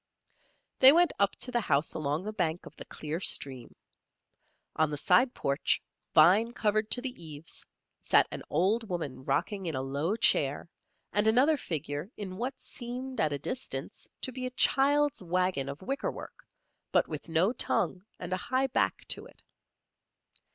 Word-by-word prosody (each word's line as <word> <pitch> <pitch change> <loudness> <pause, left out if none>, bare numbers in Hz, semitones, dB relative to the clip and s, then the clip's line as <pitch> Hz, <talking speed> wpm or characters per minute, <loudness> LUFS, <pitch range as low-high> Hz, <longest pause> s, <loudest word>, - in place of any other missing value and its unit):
They 265 +1 +10
went 345 +3 +4
up 200 0 +2
to 250 - -1
the 240 -1 +1
house 145 -6 +1
along 150 +2 -2
the 215 +2 -5
bank 175 -4 -1
of - - -12
the - - -8
clear 155 +2 -5
stream. 130 -9 -2 1.0
On 155 -1 +2
the 150 - -3
side 185 - +3
porch, 140 +1 0 0.4
vine 200 +9 +6
covered 215 -1 0
to 245 - +5
the 250 -9 -5
eaves, 155 0 -7 0.4
sat - - +4
an - - -5
old 205 +8 +1
woman 145 -8 -4
rocking 195 +7 -1
in 160 - -2
a 130 - -1
low 145 +9 -1
chair 145 -9 +2 0.5
and 205 +1 +2
another 260 +8 +5
figure 150 - -4
in 190 -3 -6
what 255 +4 -4
seemed 255 +2 -6
at 155 - +2
a 145 - -1
distance, 250 - -5
to 260 - -1
be 255 0 -4
a 255 - -10
child's 290 0 +3
wagon 180 -6 0
of 140 +6 -8
wickerwork, 275 +8 -5 0.4
but - - +3
with 155 +1 -7
no 170 +8 +2
tongue 185 -6 0 0.2
and 180 0 -4
a - - 0
high 260 +7 0
back 265 - 0
to - - -1
it. - - -21
185 Hz, 165 wpm, -29 LUFS, 155-245 Hz, 1.0 s, They